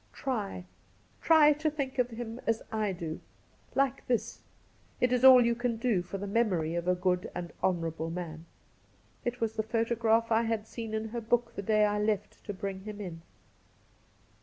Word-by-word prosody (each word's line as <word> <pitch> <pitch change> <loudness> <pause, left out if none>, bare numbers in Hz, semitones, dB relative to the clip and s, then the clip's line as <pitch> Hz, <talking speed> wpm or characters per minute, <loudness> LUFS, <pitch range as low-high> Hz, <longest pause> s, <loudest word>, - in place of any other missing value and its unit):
Try 210 -8 -3 0.3
— - - -34
try 310 -2 +6
to 310 +2 0
think 280 -3 -4
of 250 -1 +2
him 230 0 -6
as 225 -1 +1
I 215 -2 0
do 165 -3 -5 0.3
— - - -31
^like 275 -1 +2
this! 240 -3 -1 0.6
It 250 0 +2
is 250 0 +1
all 255 -2 +9
you 235 - +3
can 240 0 -1
do 225 -5 +1
for 180 +3 -6
the 200 - -5
memory 195 -7 +1
of 170 +1 -2
a 180 - +3
good 180 0 0
and 175 -1 -5
honourable 165 -3 -1
man.' 165 -1 -6 0.8
It 245 0 -3
was 225 -1 -1
the - - +3
photograph 230 0 +1
I 225 0 +4
had 225 -2 -1
seen 225 -1 -5
in 220 0 -3
her 235 +1 -4
book 235 +1 0
the - - -3
day 215 +1 +3
I 210 0 0
left 210 -1 -2
to - - -3
bring 195 0 -5
him 210 +1 -8
in. 175 -5 -6
220 Hz, 190 wpm, -30 LUFS, 190-240 Hz, 0.8 s, all